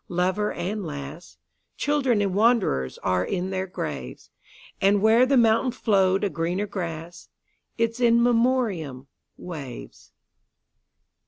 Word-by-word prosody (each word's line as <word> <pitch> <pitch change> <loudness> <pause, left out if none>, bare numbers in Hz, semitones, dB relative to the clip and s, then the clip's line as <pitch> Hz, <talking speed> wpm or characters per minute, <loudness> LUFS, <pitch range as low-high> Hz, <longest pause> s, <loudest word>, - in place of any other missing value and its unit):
Lover 185 +4 0
and 205 +3 -4
lass, 145 +1 -8 0.4
Children 270 -7 +1
and 195 -2 -1
wanderers, 205 - +2
are 90 -1 +1
in 185 - -3
their 190 0 -2
graves; 185 - -6 0.5
And 200 +1 +4
where 225 +5 +5
the 275 0 +3
fountain 230 +2 +3
flow'd 195 -5 +2
a 205 - +1
greener 175 +5 -1
grass—Its 180 +6 -6
In 235 -1 +4
Memoriam—waves. 175 - -3
195 Hz, 105 wpm, -25 LUFS, 170-230 Hz, 0.5 s, where